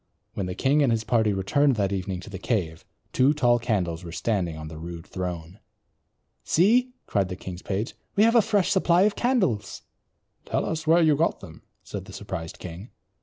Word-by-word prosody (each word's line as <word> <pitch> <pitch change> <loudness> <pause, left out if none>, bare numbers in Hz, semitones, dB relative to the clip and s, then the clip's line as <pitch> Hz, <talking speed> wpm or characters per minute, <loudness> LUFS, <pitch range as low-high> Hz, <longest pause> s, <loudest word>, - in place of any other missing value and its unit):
When 95 - -3
the 90 - -4
king 140 +3 +2
and 135 -4 +3
his 115 -1 0
party 110 -2 +2
returned 130 +8 +2
that 100 -3 0
evening 95 -1 -3
to - - -11
the 95 - -6
cave, 90 -7 -2 0.3
two 135 +4 +4
tall 120 -4 +3
candles 90 -7 -1
were 85 - -7
standing 90 -4 -1
on 80 0 -7
the 80 0 -9
rude 85 0 -7
throne. 90 0 -6 0.8
"See," 245 +9 +3
cried 100 -3 0
the 90 - -4
king's 90 -1 -8
page, 105 +3 -3 0.2
"we 205 - +5
have 230 +1 +5
a 235 - +6
fresh 205 -3 +1
supply 180 -2 +4
of 210 0 +2
candles." 225 - 0 0.6
"Tell - - -1
us 160 -1 -3
where 165 +2 +5
you 155 -2 +4
got 165 +4 0
them," 80 -5 -12 0.2
said - - -7
the - - -12
surprised 80 -1 -6
king. 90 +5 -9
105 Hz, 195 wpm, -25 LUFS, -, 0.8 s, a